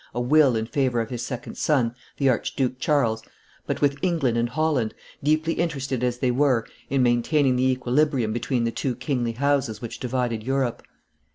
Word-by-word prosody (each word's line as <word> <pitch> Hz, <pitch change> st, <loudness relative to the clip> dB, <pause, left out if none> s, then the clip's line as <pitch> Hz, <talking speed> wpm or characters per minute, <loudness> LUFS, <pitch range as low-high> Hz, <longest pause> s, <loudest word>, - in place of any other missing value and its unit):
a -, -, -1 dB
will 135 Hz, +1 st, +4 dB
in 110 Hz, 0 st, -1 dB
favor 125 Hz, -1 st, 0 dB
of 115 Hz, +1 st, -3 dB
his 120 Hz, -2 st, -3 dB
second 125 Hz, 0 st, -6 dB
son, 125 Hz, -6 st, +1 dB, 0.2 s
the 140 Hz, -, +2 dB
Archduke 130 Hz, 0 st, 0 dB
Charles, 115 Hz, -7 st, +1 dB, 0.5 s
but -, -, -2 dB
with 140 Hz, -1 st, +2 dB
England 160 Hz, -10 st, +1 dB
and 120 Hz, 0 st, +1 dB
Holland, 145 Hz, -6 st, 0 dB, 0.3 s
deeply 155 Hz, +3 st, +1 dB
interested 135 Hz, -7 st, -2 dB
as 125 Hz, -1 st, 0 dB
they 125 Hz, 0 st, +1 dB
were 130 Hz, -3 st, +2 dB, 0.2 s
in 135 Hz, -1 st, +2 dB
maintaining 125 Hz, +3 st, +2 dB
the 130 Hz, +1 st, +2 dB
equilibrium 130 Hz, -2 st, +1 dB
between 120 Hz, +1 st, -1 dB
the 115 Hz, -, 0 dB
two 125 Hz, +1 st, -2 dB
kingly 125 Hz, -2 st, -1 dB
houses 135 Hz, -4 st, 0 dB
which 120 Hz, -1 st, -7 dB
divided 125 Hz, -3 st, -1 dB
Europe. 130 Hz, 0 st, -1 dB
130 Hz, 175 wpm, -24 LUFS, 120-140 Hz, 0.5 s, will